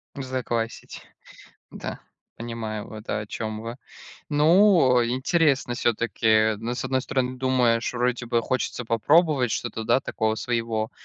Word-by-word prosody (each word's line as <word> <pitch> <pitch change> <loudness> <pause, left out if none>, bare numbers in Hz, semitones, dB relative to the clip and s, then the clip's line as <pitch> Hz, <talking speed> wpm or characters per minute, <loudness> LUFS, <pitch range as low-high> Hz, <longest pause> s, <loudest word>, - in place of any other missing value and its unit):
Заквасить. 125 -4 -4 0.7
Да. - - -7 0.4
Понимаю, 115 -2 -5
вот, 110 0 -11
э 105 - -1
о - - -9
чём 110 0 -5
вы. 115 +1 -6 0.5
Ну, 155 -3 +5
э, 120 - 0
интересно 135 0 +1
всё-таки, 115 -3 -1
э, 110 0 +4
ну, 120 +2 -3
с 130 - -4
одной 130 0 0
стороны 130 -1 -2
думаешь: 125 -3 +1
вроде 125 0 -1
бы 120 0 +1
хочется 125 0 -2
попробовать 135 +3 +3
что-то, 115 -1 -3
да, 120 +3 +3
такого 110 -3 -1
своего, 115 -2 -2
120 Hz, 140 wpm, -25 LUFS, 115-130 Hz, 0.7 s, Ну